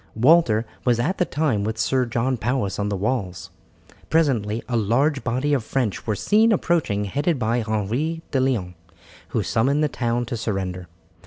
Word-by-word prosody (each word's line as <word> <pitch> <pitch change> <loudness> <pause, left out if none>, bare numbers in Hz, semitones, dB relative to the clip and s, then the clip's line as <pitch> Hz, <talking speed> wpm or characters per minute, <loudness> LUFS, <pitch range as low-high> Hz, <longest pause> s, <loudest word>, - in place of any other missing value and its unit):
Walter 120 -3 +4 0.2
was 120 -2 +2
at 170 +11 -1
the 180 - +3
time 140 -11 0
with 110 +1 -2
Sir 130 +2 +1
John 120 +3 0
Powis 120 -3 -2
on 105 0 -1
the 100 - -2
walls. 100 -3 -3 0.6
Presently 120 -9 +1
a 125 - -2
large 130 +7 +1
body 130 +5 0
of 135 -5 +1
French 115 -3 -2
were 110 - +1
seen 220 - +3
approaching 160 - +1
headed 145 - 0
by 115 0 0
Henry 115 +10 -2
de 135 - +1
Leon, 120 -9 0 0.5
who 110 - -1
summoned 135 +9 +1
the - - +3
town 120 -3 -1
to 120 - -4
surrender. 95 -5 -3
120 Hz, 170 wpm, -23 LUFS, 105-140 Hz, 0.6 s, Walter